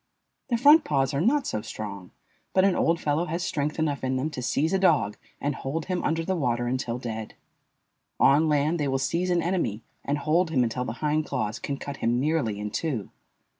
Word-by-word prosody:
The 240 - +2
front 295 +6 +7
paws 135 -1 0
are 140 - 0
not 265 - +2
so 110 - -2
strong, 100 -4 -7 0.4
but 190 0 +4
an 195 -2 +3
old 165 0 +2
fellow 150 +3 0
has 170 +1 -3
strength 150 0 -2
enough 150 -4 -1
in 130 0 0
them 140 +5 -1
to 130 - -5
seize 145 +7 0
a 190 - +3
dog 110 - +3 0.2
and 145 +1 -1
hold 145 +5 -4
him 180 -1 -2
under 165 +1 0
the 190 - 0
water 120 -6 0
until 120 -1 -2
dead. 110 -3 -6 0.8
On 155 +3 +5
land 150 +3 +2
they 145 - 0
will 135 0 +1
seize 170 +7 -1
an 175 -2 +2
enemy 165 - -1 0.2
and 145 +1 -1
hold 160 +4 +1
him 135 -6 +2
until 125 +2 -2
the 110 - -3
hind 150 +1 +1
claws 110 -6 -2
can 140 - -3
cut 140 0 -6
him 120 +1 +1
nearly 135 -8 0
in 105 0 -4
two. 125 -5 -3
145 Hz, 210 wpm, -26 LUFS, 125-165 Hz, 0.8 s, front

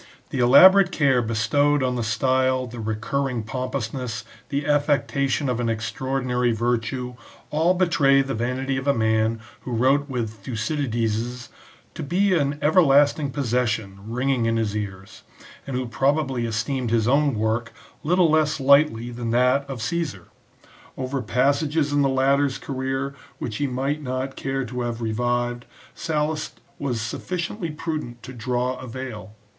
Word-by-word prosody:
The 135 - -2
elaborate 180 +10 +7
care 135 -6 +3
bestowed 125 +6 +1
on 125 -1 0
the 120 - -1
style, 130 +3 +1
the 120 -1 -9
recurring 115 +3 -2
pompousness, 125 0 -4 0.2
the 140 +1 -2
affectation 145 -1 +1
of 125 -2 -1
an 120 -1 0
extraordinary 125 +2 -1
virtue, 120 +2 -1 0.4
all 165 +4 +2
betray 145 -7 +4
the 135 0 -4
vanity 130 +3 -2
of 135 +1 -4
a 140 - +4
man 110 0 +1 0.2
who 125 - -8
wrote 135 +5 +2
with 120 -5 -2
Thucydides' 120 -1 -2 0.2
" - - -29
to - - -7
be 185 +7 +1
an 145 -4 +1
everlasting 145 -2 +4
possession" 115 -7 -1
ringing 125 0 0
in 115 0 +1
his 110 -2 -1
ears, 95 -2 -6 0.5
and 135 - -4
who 130 0 -1
probably 135 -1 0
esteemed 115 +3 -2
his 115 -1 +2
own 140 0 +3
work 110 +2 -1 0.3
little 180 +2 +3
less 155 -1 +2
lightly 135 -4 +4
than 120 -1 -4
that 125 +4 +2
of 125 -5 -5
Caesar, 145 - -3 0.7
Over 130 +1 -2
passages 140 +6 +1
in 145 - +3
the 135 - +3
latter's 135 +1 +2
career 135 0 -3 0.2
which 110 -3 -4
he 145 - 0
might 135 +4 -2
not 130 0 -3
care 135 -1 -2
to 125 +1 -5
have 120 -1 -3
revived, 120 +2 -1 0.3
Sallust 155 0 -2 0.2
was 125 -5 -2
sufficiently 170 - -4
prudent 150 -6 -5
to 130 - -8
draw 125 +1 -1
a 130 - -8
veil. 115 -4 -7
130 Hz, 150 wpm, -23 LUFS, 115-140 Hz, 0.7 s, elaborate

